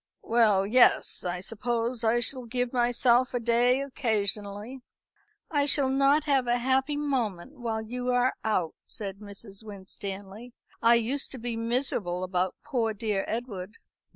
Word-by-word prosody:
"Well, 215 -4 +3
yes; 240 +5 +4
I 180 0 -3
suppose 230 +3 -2
I 230 +2 +3
shall 255 +1 0
give 245 +1 -1
myself 245 +1 +3
a - - +1
day 240 +3 +3
occasionally." 215 -2 -2 0.7
"I 290 -2 +2
shall 275 -2 +4
not 275 +3 +3
have 275 -4 +1
a 240 0 +2
happy 265 +4 +1
moment 260 - -2
while 225 -2 -2
you 245 +3 -4
are 245 +1 +2
out," 185 -7 0
said 200 -2 -6
Mrs. 200 0 -9
Winstanley. 200 +2 -8 0.3
"I 230 +1 +6
used 245 +5 +1
to - - -6
be 235 -1 -3
miserable 230 -6 -1
about 185 0 -1
poor 235 -7 -1
dear 210 -2 -1
Edward." 210 -4 -5
235 Hz, 145 wpm, -28 LUFS, 205-255 Hz, 0.7 s, I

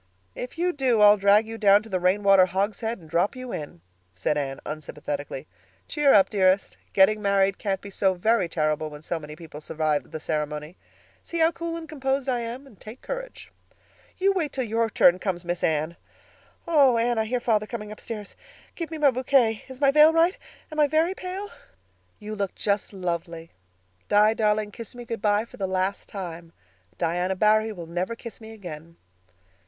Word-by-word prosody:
"If 250 +6 -7
you 355 +1 +1
do 260 -5 +1
I'll 205 0 +8
drag 200 +2 +4
you 225 0 -7
down 205 0 +5
to - - -12
the 185 -2 -1
rainwater 190 +1 +4
hogshed 205 +5 -2
and 165 - -15
drop 170 +8 +1
you 255 -1 -7
in," 145 - -6 0.3
said 95 +11 0
Anne 135 -2 -3
unsympathetically. 145 -2 -5 0.4
"Cheer 295 -2 +3
up, 195 -5 +5
dearest. 190 -1 +2 0.2
Getting 210 +2 +4
married 195 -1 +2
can't 195 -2 -2
be 200 - -9
so 190 -1 +1
very 195 -1 +1
terrible 155 -1 -1
when 150 0 -11
so 165 +1 -3
many 150 0 -9
people 155 -2 -11
survive 155 -1 -1
the 155 - -6
ceremony. 150 +1 -3 0.5
See 340 - -6
how 325 0 +4
cool 335 -1 -5
and 325 -1 -8
composed 275 -2 -2
I 250 -2 +1
am, 235 +4 -6
and 225 -8 -18
take 220 +4 -11
courage." - - -7 0.7
"Wait 370 -6 +1
till 265 - -2
your 225 0 0
turn 180 -4 +5
comes, 180 -3 -3
Miss 175 0 -3
Anne. 155 +2 0 0.7
Oh, 280 -7 +5
Anne, 235 0 +1
I 220 - +1
hear 250 +3 -1
father 215 -3 +1
coming 210 -3 -6
upstairs. 210 -1 -7 0.4
Give 335 -2 -5
me 320 - -5
my 290 -3 +4
bouquet. 250 -3 +2
Is 260 -1 -10
my 275 -1 +4
veil 305 +2 +7
right? 330 +3 +3 0.4
Am 310 - -4
I 295 - +5
very 320 +5 +2
pale?" 385 +3 -6 0.7
"You 215 0 -7
look 200 -3 -3
just 200 -1 -1
lovely. 170 -3 -4 0.6
Di, 210 +1 +5
darling, 215 -1 +1
kiss 230 +2 -9
me 240 0 -8
good 230 -3 -5
bye 210 +1 +2
for - - -15
the 195 - -2
last 185 +1 -2
time. 170 -4 -7 0.4
Diana 180 +2 0
Barry 215 +2 +3
will 175 -5 -7
never 175 +7 -3
kiss 230 0 -10
me 220 0 -10
again." 170 -6 -10
210 Hz, 185 wpm, -25 LUFS, 175-245 Hz, 0.7 s, I'll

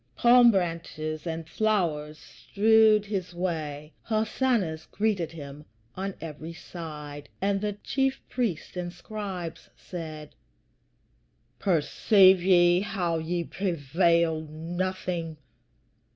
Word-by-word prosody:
Palm 240 0 +7
branches 165 -4 -2
and 165 -1 -4
flowers 165 -7 0
strewed 215 +2 +3
his 190 -4 -4
way, 155 -4 -3
hosannas 215 -6 0
greeted 200 -6 -1
him 145 -2 -9 0.3
on 195 +1 -4
every 160 +1 -7
side, 150 -4 -8
and 195 0 0
the 210 -1 -1
chief 270 0 0
priests 220 -12 -2
and 175 -1 -4
Scribes 185 -2 -6
said, 155 -4 -8 1.3
"Perceive 185 +2 +4
ye 175 -1 +5
how 175 -5 -1
ye 170 +2 -2
prevail 170 -2 +1
nothing? 170 0 -3
175 Hz, 95 wpm, -27 LUFS, 160-200 Hz, 1.3 s, Palm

